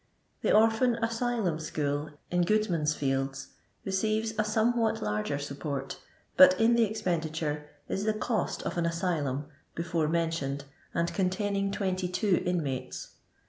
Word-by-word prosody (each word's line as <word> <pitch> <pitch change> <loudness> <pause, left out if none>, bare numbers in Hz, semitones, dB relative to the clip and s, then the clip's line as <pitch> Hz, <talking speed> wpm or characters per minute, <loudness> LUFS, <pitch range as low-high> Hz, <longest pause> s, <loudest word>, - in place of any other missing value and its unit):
The - - +2
Orphan 225 +3 +4
Asylum 230 -6 0
School, 145 -1 -2 0.2
in 175 0 +3
GfoodmanV 175 -7 +1
fields, 135 -1 -1 0.4
receires 215 +3 0
a - - +4
somewhat 225 +1 +2
larger 105 +7 -1
support, 140 -1 -4 0.4
but 280 -1 +8
in 225 +1 +5
the 235 -1 +5
expenditure 160 -7 -2 0.2
is 195 - -2
the 215 0 +1
cost 220 +1 -1
of 175 - -2
an 170 - +1
asylum 155 -5 -1 0.3
(before 170 -2 0
mentioned, 160 -4 -1 0.3
and 170 0 0
containing 195 +1 0
22 185 0 0
inmates). 150 -8 -2
175 Hz, 125 wpm, -29 LUFS, 150-215 Hz, 0.4 s, but